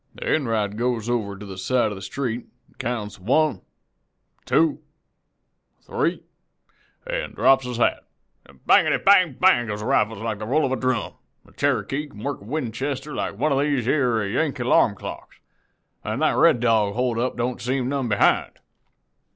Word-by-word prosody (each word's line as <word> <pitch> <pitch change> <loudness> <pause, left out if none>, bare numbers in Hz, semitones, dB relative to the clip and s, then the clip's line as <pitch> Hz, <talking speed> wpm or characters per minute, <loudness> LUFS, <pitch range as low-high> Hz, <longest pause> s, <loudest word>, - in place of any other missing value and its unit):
"Enright 110 -8 -1
goes 120 -2 -1
over 100 -5 -2
to 105 - -9
the 95 -1 -8
side 120 +1 +1
of - - -5
the 95 - -9
street, 120 +3 -4 0.3
counts 110 -4 -4
'one,' 130 +2 +1 0.8
'two,' 155 -2 +2 1.0
'three,' - - -1 0.8
an' - - -4
drops 135 -1 +3
his 125 -2 -4
hat. 120 - +1 0.6
Bangety! - - +5
Bang! 185 -6 +4
Bang! 125 -11 +4
goes 105 -1 -4
the - - -5
rifles 115 -5 +1
like 110 0 -4
the 105 - -5
roll 150 +5 +2
of 130 - -2
a - - +1
drum. 130 -2 -1 0.4
Cherokee 140 +2 -1
can 105 -6 -12
work 140 -5 -3
a - - -13
Winchester 135 +2 -3
like - - -3
one 155 - +1
of 135 - +2
these 140 -4 0
yere 120 -6 +1
Yankee 135 +4 -1
'larm 115 -3 +3
clocks, - - -9 0.7
an' - - -3
that - - +2
Red - - +5
Dog 110 -4 +2
hold 125 -1 0
up 125 +2 -1
don't 120 +1 -2
seem 130 0 -1
none 135 -2 -1
behind. 100 - +2
125 Hz, 160 wpm, -23 LUFS, 110-140 Hz, 1.0 s, Bangety